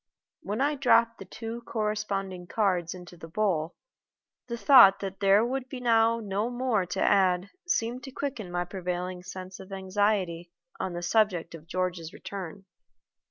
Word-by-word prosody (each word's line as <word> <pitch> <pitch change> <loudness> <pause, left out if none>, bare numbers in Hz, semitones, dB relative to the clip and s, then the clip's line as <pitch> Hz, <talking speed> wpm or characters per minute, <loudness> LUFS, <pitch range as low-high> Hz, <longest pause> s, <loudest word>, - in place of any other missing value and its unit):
When 210 +5 -3
I 290 +2 +2
dropped 235 -4 +3
the - - -8
two 230 +1 -7
corresponding 200 -4 -2
cards 185 -5 0
into 180 -1 -11
the 165 -1 -10
bowl, 170 -3 -1 0.7
the 235 -1 -4
thought 200 -4 +8
that 195 -1 -5
there 200 +2 +5
would 260 +1 -3
be 265 - -6
now 230 -1 +3
no 205 +1 -2
more 240 -6 0
to 175 +2 -4
add 190 -1 +3 0.2
seemed 240 -5 0
to 270 - -8
quicken 255 -8 -4
my 175 0 -1
prevailing 180 -1 -4
sense 185 0 -8
of 190 +1 -11
anxiety 190 -3 0 0.3
on 190 -2 -3
the 175 0 -5
subject 185 -4 +1
of 165 -1 -11
George's 180 -2 -3
return. 195 -1 -7
195 Hz, 160 wpm, -28 LUFS, 180-225 Hz, 0.7 s, thought